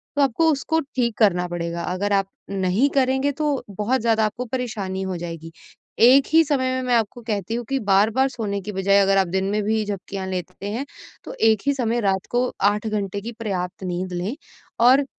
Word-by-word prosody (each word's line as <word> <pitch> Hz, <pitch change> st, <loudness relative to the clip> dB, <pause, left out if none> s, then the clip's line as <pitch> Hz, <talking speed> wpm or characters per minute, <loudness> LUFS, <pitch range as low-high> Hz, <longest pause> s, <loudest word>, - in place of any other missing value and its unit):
तो 285 Hz, -, +2 dB
आपको 280 Hz, +5 st, +3 dB
उसको 315 Hz, +3 st, 0 dB, 0.2 s
ठीक 235 Hz, -3 st, 0 dB
करना 180 Hz, -5 st, +3 dB
पड़ेगा, 170 Hz, 0 st, -4 dB
अगर 190 Hz, +4 st, -1 dB
आप 195 Hz, -1 st, +2 dB, 0.2 s
नहीं 195 Hz, +7 st, +1 dB
करेंगे, 265 Hz, +1 st, +2 dB
तो 295 Hz, -1 st, -1 dB
बहुत 215 Hz, +6 st, -1 dB
ज़्यादा 225 Hz, -1 st, +2 dB
आपको 225 Hz, +4 st, -3 dB
परेशानी 220 Hz, -6 st, -3 dB
हो 190 Hz, -2 st, -3 dB
जाएगी। 165 Hz, -1 st, -7 dB, 0.5 s
एक 260 Hz, +4 st, +7 dB
ही 325 Hz, -, +7 dB
समय 260 Hz, -4 st, 0 dB
में 260 Hz, -, -1 dB
मैं 245 Hz, -, +3 dB
आपको 230 Hz, +1 st, -1 dB
कहती 215 Hz, -1 st, -3 dB
हूँ 240 Hz, 0 st, -4 dB
कि 270 Hz, -, 0 dB
बार-बार 220 Hz, +7 st, +3 dB
सोने 205 Hz, -6 st, -3 dB
की 210 Hz, +3 st, -6 dB
बजाए, 195 Hz, +1 st, +2 dB
अगर 195 Hz, 0 st, +3 dB
आप 190 Hz, -1 st, +3 dB
दिन 190 Hz, +2 st, -1 dB
में 210 Hz, 0 st, 0 dB
भी 220 Hz, +1 st, +1 dB
झपकियाँ 195 Hz, -1 st, -5 dB
लेते 185 Hz, +1 st, -5 dB
हैं, 255 Hz, +6 st, -3 dB, 0.4 s
तो -, -, -8 dB
एक 220 Hz, -2 st, +3 dB
ही 280 Hz, -, +4 dB
समय 240 Hz, -3 st, 0 dB
रात 190 Hz, -1 st, -1 dB
को 245 Hz, +1 st, +1 dB, 0.2 s
8 210 Hz, +1 st, -3 dB
घंटे 200 Hz, -2 st, -2 dB
की 235 Hz, +3 st, -6 dB
पर्याप्त 190 Hz, -4 st, -4 dB
नींद 180 Hz, 0 st, -3 dB
लें 185 Hz, +9 st, -3 dB, 0.5 s
और 275 Hz, +2 st, +5 dB
210 Hz, 200 wpm, -22 LUFS, 190-250 Hz, 0.5 s, एक